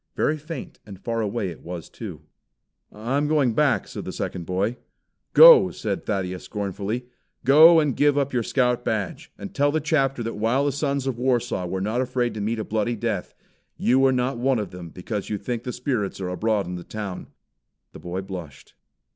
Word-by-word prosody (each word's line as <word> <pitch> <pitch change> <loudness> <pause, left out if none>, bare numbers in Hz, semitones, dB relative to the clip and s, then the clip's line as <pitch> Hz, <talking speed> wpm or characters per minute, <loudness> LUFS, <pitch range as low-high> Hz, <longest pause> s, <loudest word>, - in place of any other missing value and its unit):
Very 155 - +1
faint 155 -2 -8
and 100 -3 -11
far 115 +2 -2
away 105 -2 -2
it 85 - -10
was 85 -1 -7
too. - - -8 0.7
"I'm 130 +7 -1
going 145 -6 +2
back," 145 +1 +2
said - - -7
the - - -5
second 85 -3 -5
boy. 100 +6 -1 0.6
"Go!" - - +9
said - - -4
Thaddeus 95 -3 -2
scornfully, 105 +4 -3 0.4
"Go 160 +5 +8
and 145 -5 +1
give 145 -1 +3
up 140 -1 0
your 125 - +2
Scout 125 0 +1
badge, 105 -4 -3
and 100 - -8
tell 145 +1 +2
the 155 - +1
chapter 135 -5 0
that 115 - -3
while 115 +6 +1
the 145 - +2
sons 140 -1 -1
of 130 -3 -2
Warsaw 120 -7 0
were 95 +2 -3
not 110 +5 0
afraid 125 -1 -1
to 105 - -5
meet 110 +3 -1
a 110 - -2
bloody 110 +2 -1
death, 105 - -3 0.4
you 130 +2 +3
are - - +3
not 125 0 -1
one 130 +1 +2
of 105 -5 -4
them 90 -2 -8
because 95 +4 -5
you 105 - -1
think 115 +3 -4
the 125 - -5
spirits 125 -7 -2
are 90 -2 -3
abroad 105 +2 0
in 90 0 -5
the 85 - -8
town." 100 -3 -6 0.6
The - - -11
boy 90 +2 -4
blushed. 90 -7 -9
115 Hz, 195 wpm, -24 LUFS, 100-135 Hz, 0.7 s, Go